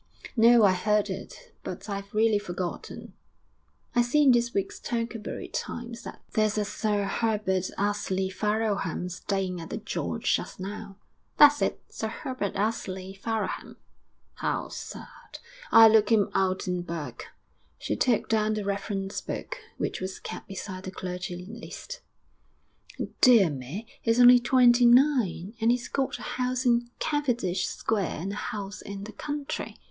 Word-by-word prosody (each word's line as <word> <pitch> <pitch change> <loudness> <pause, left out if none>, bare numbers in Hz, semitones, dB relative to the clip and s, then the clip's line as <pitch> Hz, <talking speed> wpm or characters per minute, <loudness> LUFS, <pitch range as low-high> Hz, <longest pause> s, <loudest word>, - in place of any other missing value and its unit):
'No; 235 0 +6
I 195 - +6
heard 210 +3 +1
it, - - -9
but - - -6
I've 200 -1 -5
really 215 -1 +3
forgotten.' 180 -3 -6 0.8
'I 240 - +4
see 260 +5 +3
in 275 - +7
this 240 -1 +2
week's 395 +5 -2
Tercanbury 230 -2 -4
Times 235 -1 -5
that - - -10
there's 215 -1 +2
a 210 - +1
Sir 210 0 -1
Herbert 200 -3 0
Ously 200 -2 0
Farrowham 210 -4 -1
staying 185 -1 -2
at 165 - -8
the - - -3
"George" 215 - -2
just - - -5
now.' 195 0 -7 0.4
'That's 290 0 +7
it. - - -1
Sir 220 - -4
Herbert 225 -2 -4
Ously 190 -2 -2
Farrowham.' 220 +3 -3 0.6
'How - - -2
sad! - - -9 0.3
I'll 225 -1 +9
look 215 0 +4
him 215 -3 +3
out 190 0 0
in 180 -1 -1
Burke.' 170 -4 -6 0.5
She - - -2
took 240 -4 +2
down 215 -1 +1
the 210 -2 -3
reference 200 0 -3
book, - - -5 0.2
which - - -3
was 185 0 -4
kept - - -7
beside 190 -1 -6
the - - -4
clergy 180 -1 -5
list. 235 - -8 1.2
'Dear 225 -10 +7
me, 140 - -6 0.2
he's 230 +1 +2
only 245 0 +9
twenty 245 -1 +5
nine.... 240 - +3
And 225 - +3
he's 245 +1 +1
got 270 -1 -1
a - - -10
house 255 +1 -2
in 240 -1 +3
Cavendish 240 - 0
Square 205 -5 -1
and 190 +4 -3
a - - -5
house 200 -1 -5
in 200 0 -7
the 215 - -7
country. 290 -1 -4
215 Hz, 150 wpm, -27 LUFS, 195-240 Hz, 1.2 s, I'll